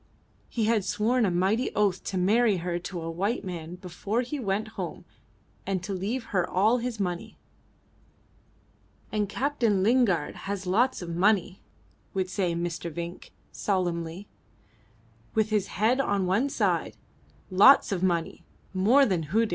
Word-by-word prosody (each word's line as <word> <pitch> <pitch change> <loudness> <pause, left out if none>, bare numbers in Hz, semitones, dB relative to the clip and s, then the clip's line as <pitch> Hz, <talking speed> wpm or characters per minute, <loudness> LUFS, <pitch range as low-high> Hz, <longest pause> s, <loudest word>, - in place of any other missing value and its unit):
He 225 -3 -1
had 220 -2 +2
sworn 230 +4 +1
a - - +2
mighty 190 +8 +1
oath 200 -3 +1
to 190 - -3
marry 210 +3 +3
her 175 0 -2
to 175 0 -6
a 165 - -4
white 200 +7 -2
man 170 -2 -6
before 185 +5 -3
he 280 +4 -5
went 210 -1 -1
home - - -6 0.6
and 190 -2 -2
to 200 +1 -4
leave 210 +7 -2
her 180 -2 +1
all 215 +7 +3
his 235 -2 -4
money. 180 -3 -3 1.7
"And 210 -2 -1
Captain 240 -8 +1
Lingard 215 -9 +2
has 200 -1 -3
lots 220 +4 +1
of 170 -1 -5
money," 190 0 +2 0.5
would 185 -1 -1
say 180 -4 0
Mr. 170 0 -3
Vinck 170 +2 -7 0.2
solemnly, 175 -1 -2 1.1
with 220 0 +1
his 210 -2 +1
head 225 +7 +1
on 200 -7 0
one 205 +10 +1
side, - - 0 0.5
"lots 205 +7 +7
of 185 -3 -1
money; 170 -3 -1 0.3
more 225 +9 +5
than 180 -8 0
Hudig!" 220 +8 +1
195 Hz, 145 wpm, -27 LUFS, 180-220 Hz, 1.7 s, lots